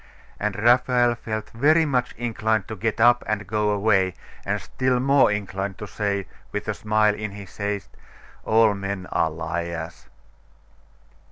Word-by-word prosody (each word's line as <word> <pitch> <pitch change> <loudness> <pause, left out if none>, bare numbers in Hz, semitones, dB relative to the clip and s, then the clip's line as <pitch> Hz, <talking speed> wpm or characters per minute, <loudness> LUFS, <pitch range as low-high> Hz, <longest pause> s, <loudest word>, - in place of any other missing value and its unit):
And 105 -1 -1
Raphael 120 +2 +3
felt 110 -2 -5
very 155 +7 +4
much 125 -4 0
inclined 110 -3 -1
to 110 - -4
get 115 0 -2
up 120 +1 +5
and 105 -1 -1
go 105 +2 0
away, 100 -3 +2 0.3
and 105 +1 -1
still 130 +6 0
more 135 -2 +4
inclined 100 -2 -3
to 105 - -6
say, 100 -1 -2 0.3
with 105 - -4
a 105 - 0
smile, 105 0 +2
in 105 -1 -5
his 100 -2 -11
haste, 100 -1 -3 0.5
'All 110 -1 +4
men 100 -1 -4
are 80 - +2
liars. 85 0 -5
105 Hz, 150 wpm, -24 LUFS, 100-115 Hz, 0.5 s, up